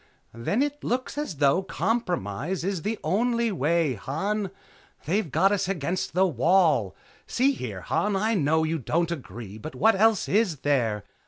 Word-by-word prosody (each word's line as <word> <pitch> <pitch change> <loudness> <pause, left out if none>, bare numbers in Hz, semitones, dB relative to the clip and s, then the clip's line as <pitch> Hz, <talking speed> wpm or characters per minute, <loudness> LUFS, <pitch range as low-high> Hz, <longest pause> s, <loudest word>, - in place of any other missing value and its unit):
"Then 160 - 0
it 290 0 -4
looks 255 +2 -2
as 290 - -3
though 140 +4 +3
compromise 180 - -2
is 190 -2 -2
the 215 +6 -2
only 235 +7 +1
way, 165 -3 +1
Han. 190 - -2 0.6
They've 185 +3 0
got 195 +8 +3
us 200 -2 0
up 195 - 0
against 175 +3 -3
the 190 +1 +4
wall. 160 - +2 0.3
See 265 +3 +2
here, 110 - -5
Han, 205 - 0
I 215 +4 +1
know 160 -4 +2
you 160 +1 -1
don't 170 +6 0
agree, 110 - -7
but 155 +8 -8
what 225 +1 +4
else 215 +1 +3
is 195 - +1
there? 115 -8 +1
175 Hz, 165 wpm, -26 LUFS, 140-210 Hz, 0.6 s, the